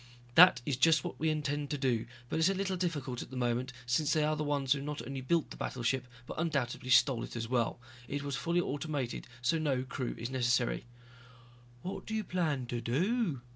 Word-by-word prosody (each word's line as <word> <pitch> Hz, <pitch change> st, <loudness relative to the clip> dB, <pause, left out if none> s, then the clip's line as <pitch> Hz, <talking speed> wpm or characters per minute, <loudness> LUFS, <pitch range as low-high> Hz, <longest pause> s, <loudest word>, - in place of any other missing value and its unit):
"That 165 Hz, -5 st, +8 dB
is 140 Hz, -4 st, 0 dB
just 155 Hz, +1 st, +5 dB
what -, -, -6 dB
we 160 Hz, -, +2 dB
intend 145 Hz, -1 st, -1 dB
to 145 Hz, -, -1 dB
do, 125 Hz, -5 st, 0 dB, 0.2 s
but 160 Hz, -, -1 dB
it's 160 Hz, +3 st, +5 dB
a 195 Hz, -, +1 dB
little 190 Hz, 0 st, -1 dB
difficult 150 Hz, -9 st, -2 dB
at -, -, -8 dB
the 130 Hz, -, -7 dB
moment 125 Hz, +1 st, 0 dB
since 140 Hz, +5 st, +2 dB
they 155 Hz, -2 st, +3 dB
are 155 Hz, +1 st, +2 dB
the 155 Hz, -, -2 dB
ones 140 Hz, -2 st, +2 dB
who 140 Hz, -, -3 dB
not 145 Hz, -4 st, -4 dB
only 135 Hz, +1 st, -4 dB
built 160 Hz, +5 st, +1 dB
the -, -, -8 dB
battleship, 125 Hz, +1 st, -1 dB, 0.2 s
but -, -, -6 dB
undoubtedly 135 Hz, -6 st, -1 dB
stole 125 Hz, -1 st, +5 dB
it -, -, -7 dB
as 115 Hz, -1 st, -3 dB
well. 120 Hz, -1 st, 0 dB, 0.3 s
It 145 Hz, +2 st, -3 dB
was 140 Hz, -1 st, -2 dB
fully 170 Hz, +5 st, +1 dB
automated 145 Hz, -5 st, -3 dB, 0.2 s
so 165 Hz, +5 st, +2 dB
no 135 Hz, -5 st, +1 dB
crew 130 Hz, -1 st, -4 dB
is 115 Hz, +3 st, -4 dB
necessary." 125 Hz, -2 st, +1 dB, 1.0 s
"What 185 Hz, -, -5 dB
do 220 Hz, -, -2 dB
you 215 Hz, -, 0 dB
plan 160 Hz, -9 st, -1 dB
to 120 Hz, 0 st, -3 dB
do?" 165 Hz, -, 0 dB
140 Hz, 215 wpm, -32 LUFS, 125-160 Hz, 1.0 s, That